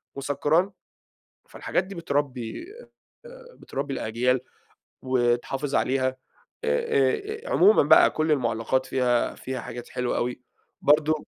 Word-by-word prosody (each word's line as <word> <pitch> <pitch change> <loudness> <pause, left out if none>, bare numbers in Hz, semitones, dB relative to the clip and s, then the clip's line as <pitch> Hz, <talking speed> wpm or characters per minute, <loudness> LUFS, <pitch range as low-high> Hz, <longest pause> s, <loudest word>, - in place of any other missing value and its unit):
وسكران، 145 +7 +1 0.8
فالحاجات 180 - -2
دي 195 +1 -9
بتربي 145 - -3 0.7
آآ، - - -16
بتربي 140 0 -5
الأجيال 125 +2 0 0.6
وتحافظ 130 +2 0
عليها 130 0 +1 0.6
آآ 140 - 0
آآ - - -6
عمومًا 415 +3 +6
بقى - - +6
كُلّ 155 0 -1
المُعلّقات 120 -1 0
فيها 125 -2 +1
فيها 130 -1 -5
حاجات 120 +1 -8
حلوة 125 -1 -2
أوي 125 +1 -2 0.4
برضو 150 +1 +4
135 Hz, 110 wpm, -25 LUFS, 125-150 Hz, 0.8 s, عمومًا